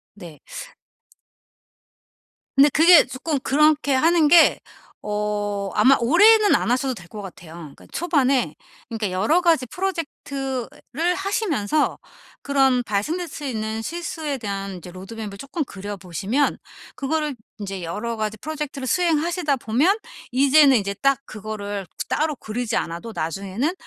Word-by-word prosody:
네. 170 -7 -12 2.2
근데 280 +2 +7
그게 335 +1 +7
조금 270 +4 -3
그렇게 295 +1 +3
하는 320 +3 +4
게 335 +2 +6 0.5
어 205 -1 -2
아마 270 +1 +5
오래는 410 - +5
안 235 - 0
하셔도 260 +1 +1
될 175 -5 -12
거 210 - -8
같아요. 170 -3 -11 0.2
그러니까 - - -17
초반에 275 -6 +1 0.3
그러니까 220 -5 -3
여러 220 - +2
가지 330 -7 +3
프로젝트를 290 -2 -3
하시면서 345 - 0 0.4
그런 270 -3 +2
발생될 275 - -2
수 295 -1 -9
있는 220 -4 -3
실수에 320 -1 -4
대한 195 -4 -5
이제 180 0 -11
로드맵을 200 +2 -8
쪼끔 275 - -4
그려보시면 200 - -2 0.4
그거를 300 0 -2 0.2
인제 195 -3 -6
여러 210 +8 -4
가지 215 -1 -3
프로젝트를 295 -2 -5
수행하시다 335 -1 +1
보면 275 - +2 0.3
이제는 275 +1 +5
이제 200 -2 -2
딱 275 -1 +3
그거를 205 -2 -6 0.2
따로 305 0 0
그리지 225 +1 -3
않아도 170 +7 -4
나중에는 195 - -2
260 Hz, 300 characters per minute, -22 LUFS, 205-310 Hz, 2.2 s, 근데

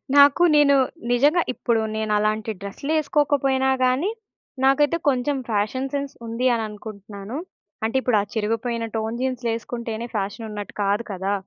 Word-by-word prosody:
నాకు 285 +4 +7
నేను 290 -1 +6 0.4
నిజంగా 290 +8 +4
ఇప్పుడు 235 -2 0
నేనలాంటి 215 0 0
డ్రెసులు 200 +9 -5
ఏసుకోకపోయినా 280 -3 +2
గానీ 255 +9 +2 0.5
నాకైతే 290 +4 +4
కొంచేం 275 +1 +2
ఫ్యాషన్ 225 +6 0
సెన్స్ 280 -1 -2
ఉంది. 230 +2 -2
అని 230 -1 0
అనుకుంటున్నాను. 210 +1 -8 0.5
అంటే 225 +3 -1
ఇప్పుడు 250 -4 +2
ఆ - - -2
చిరిగిపోయిన 230 +1 -1
టోన్ 220 +1 -2
జీన్సులు 255 -2 -1
ఏసుకుంటేనే 230 0 -5
ఫ్యాషనున్నట్టు 205 +1 -4
కాదు 200 +3 +1
కదా! 195 +1 -2
235 Hz, 130 wpm, -23 LUFS, 215-270 Hz, 0.5 s, నాకు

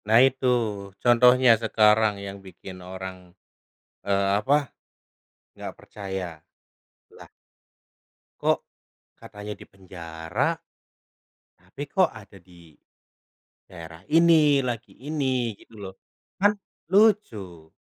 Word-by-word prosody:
Nah, 110 +1 +5
itu 130 -1 0 0.6
contohnya 125 +1 +6
sekarang 110 -1 +4
yang 100 0 -8
bikin 95 0 -11
orang, 95 +1 -7 0.9
eee, 100 0 +2
apa, 140 +5 +1 0.8
nggak - - -8
percaya. 95 -5 -7 0.8
Lah - - -13 1.1
kok - - +2 0.6
katanya 105 0 -8
dipenjara, 85 -5 -4 1.1
tapi 95 +11 -10
kok 185 +3 +2
ada 105 -2 -14
di 85 -3 -19 0.9
daerah 80 0 -11
ini, 160 -3 +5
lagi 120 -2 -5
ini. 130 -5 -1
Gitu, - - -20
loh. 95 -2 -8 0.5
Kan 205 0 +6 0.4
lucu. 110 - +1
105 Hz, 90 wpm, -25 LUFS, 95-130 Hz, 1.1 s, contohnya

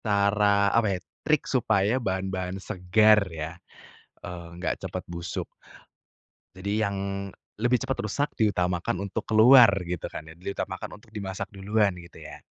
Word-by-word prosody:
Cara, 100 -1 +3
apa 105 -5 +2
ya - - -10 0.2
trik 155 -1 +1
supaya 110 -1 +1
bahan-bahan 95 -2 -2
segar 105 +2 +3
ya, 80 -1 -5 0.7
eee, 85 -1 -8
nggak 90 +1 -3
cepet - - -5
busuk. 85 0 -4 1.2
Jadi 100 +3 -1
yang 100 -1 -1 0.6
lebih 120 +3 +2
cepat 135 -1 -2
rusak 140 +7 -1
diutamakan 90 -5 0
untuk 100 - -3
keluar, 115 +2 +8 0.2
gitu 90 -1 -4
kan. 80 - -8
Diutamakan 95 +3 -5
untuk 110 +1 -23
dimasak 100 -1 -4
duluan, 100 0 +1
gitu 85 - -15
ya. 75 - -11
100 Hz, 135 wpm, -26 LUFS, 90-110 Hz, 1.2 s, keluar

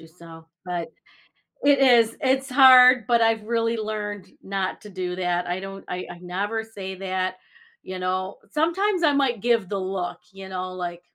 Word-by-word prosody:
you 165 - -14
so, 165 -1 -14 0.2
but 175 -2 -4 0.8
it 285 -1 +4
is, 240 -4 +4
it's 265 0 +1
hard, 255 -2 +7
but 235 -1 +3
I've 225 -1 +2
really 230 +1 -1
learned 210 -3 -5
not 195 -1 -3
to 210 - -10
do 180 -1 -4
that, 180 -1 -1
I 175 +1 -2
don't 195 0 -8
I 180 0 -5
I 175 - -11
never 200 +5 -3
say 195 -4 -8
that, 185 -1 -2 0.5
you 185 0 -7
know? 185 +1 -2
Sometimes 345 +5 0
I 300 -2 +4
might 265 -6 +1
give 230 -5 +1
the 200 - -2
look, 185 -2 -4
you 195 0 -10
know, 185 0 -5
like 175 -1 -6
195 Hz, 180 wpm, -24 LUFS, 185-235 Hz, 0.8 s, hard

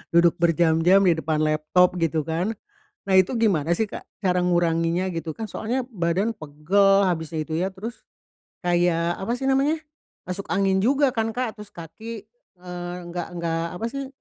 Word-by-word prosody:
duduk 170 0 +4
berjam-jam 170 +3 +4
di 170 -3 +3
depan 155 0 0
laptop 155 +4 +2
gitu 160 -2 0
kan, 170 +8 -2 0.5
nah - - -1
itu 185 +7 +1
gimana 175 -8 +2
sih 220 - 0
Kak - - -8 0.2
cara 180 -1 +2
nguranginya 175 +1 +1
gitu 165 -1 -4
kan 220 -2 -6
soalnya 250 +4 -2
badan 185 +3 0
pegel 195 +6 +2
habis 165 -3 -1
itu 160 +1 -2
ya 185 - +1
terus, 225 +5 -8 0.6
kayak 175 -1 +1
apa 230 +5 -2
sih 270 +2 -1
namanya? 295 +4 +1 0.4
Masuk 185 +2 -5
angin 195 -1 +2
juga 270 +7 +3
kan 225 -2 -2
Kak 245 -3 -3
terus 210 -1 -10
kaki, 215 +7 -8 0.4
eee, 175 -1 -6 0.2
nggak 175 -1 -4
nggak 165 -1 -1 0.2
apa 225 - -2
sih, 275 +1 -5
180 Hz, 165 wpm, -24 LUFS, 165-215 Hz, 0.6 s, duduk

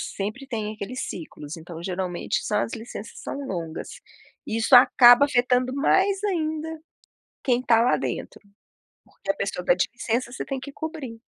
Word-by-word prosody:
sempre 215 +8 -4
tem 220 -4 -3
aqueles 220 +5 -5
ciclos. 155 -2 -8
Então, 165 0 -9
geralmente, 180 -1 -2
são 210 -1 +1
as 225 - -3
licenças 225 -1 -8
são - - -5
longas, 165 -5 -5 0.6
isso 225 +4 +4
acaba 245 +1 +8
afetando 250 -1 +2
mais 385 +7 +2
ainda 320 -4 -2 0.6
quem 250 -2 +2
está 230 -3 +4
lá 245 - +3
dentro, - - -4 0.7
porque - - -14
a - - -11
pessoa 195 -5 -3
pede 180 +1 +3
licença, 240 0 -2
você - - -5
tem 270 -1 -3
que 280 - -8
cobrir. 285 -7 -6
240 Hz, 155 wpm, -25 LUFS, 200-275 Hz, 0.7 s, acaba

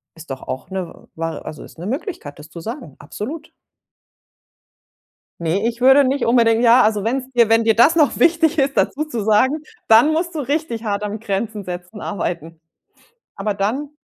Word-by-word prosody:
ist 165 0 -13
doch 130 - -6
auch 130 - -6
'ne 190 -2 -7
war 165 0 -5
also, 150 - -8
ist - - -15
'ne 175 - -7
Möglichkeit, 260 - -5
das 150 +1 -12
zu 170 - -10
sagen, 220 - -7
absolut. 285 - -7 1.9
Ne, 175 +6 0
ich 235 0 -8
würde 265 +3 +6
nicht 270 0 0
unbedingt 230 -1 +3
ja, 245 +1 +6
also, 210 -1 +1
wenn's 260 +3 -2
dir 235 -2 +4
wenn 225 +1 +3
dir 225 0 +3
das 240 +9 +5
noch 305 -4 +2
wichtig 325 -1 +3
ist, 275 0 +1
dazu 305 +2 0
zu 240 -8 -4
sagen, 260 +9 +2 0.2
dann 230 +7 +6
musst 335 +2 -2
du - - -2
richtig 285 -4 -2
hart 205 -2 -2
am 210 0 -4
Grenzen 210 0 -3
setzen 180 +3 -8
arbeiten. 170 -4 -4 0.8
Aber 205 +1 -2
dann 240 +9 -2
225 Hz, 180 wpm, -20 LUFS, 195-275 Hz, 1.9 s, würde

